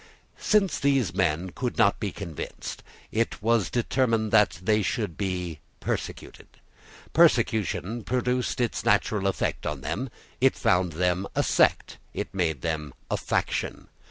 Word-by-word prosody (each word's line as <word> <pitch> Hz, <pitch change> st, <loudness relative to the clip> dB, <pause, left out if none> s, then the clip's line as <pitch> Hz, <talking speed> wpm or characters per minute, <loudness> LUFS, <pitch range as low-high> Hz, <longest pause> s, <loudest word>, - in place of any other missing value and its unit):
Since 200 Hz, -5 st, +2 dB
these 135 Hz, -8 st, +2 dB
men 90 Hz, -1 st, 0 dB
could 125 Hz, +4 st, -3 dB
not 100 Hz, -, +4 dB
be 100 Hz, -, -2 dB
convinced, 85 Hz, -7 st, -6 dB, 0.3 s
it 115 Hz, +1 st, 0 dB
was 110 Hz, -4 st, +2 dB
determined 115 Hz, -3 st, +1 dB
that 105 Hz, -5 st, +4 dB
they 105 Hz, +4 st, +2 dB
should 105 Hz, -3 st, -2 dB
be 90 Hz, -5 st, -3 dB, 0.2 s
persecuted. -, -, -5 dB, 0.7 s
Persecution 110 Hz, +1 st, +2 dB
produced 125 Hz, +1 st, 0 dB
its 120 Hz, -2 st, 0 dB
natural 100 Hz, -3 st, +2 dB
effect 95 Hz, -, -1 dB
on -, -, -3 dB
them. 130 Hz, +1 st, -3 dB, 0.3 s
It 135 Hz, +1 st, +4 dB
found 90 Hz, -2 st, +2 dB
them 90 Hz, +3 st, 0 dB
a -, -, +2 dB
sect: -, -, +2 dB, 0.2 s
it -, -, -4 dB
made 80 Hz, -7 st, 0 dB
them 75 Hz, -3 st, -3 dB, 0.2 s
a -, -, +3 dB
faction. -, -, -2 dB
105 Hz, 135 wpm, -26 LUFS, 90-120 Hz, 0.7 s, not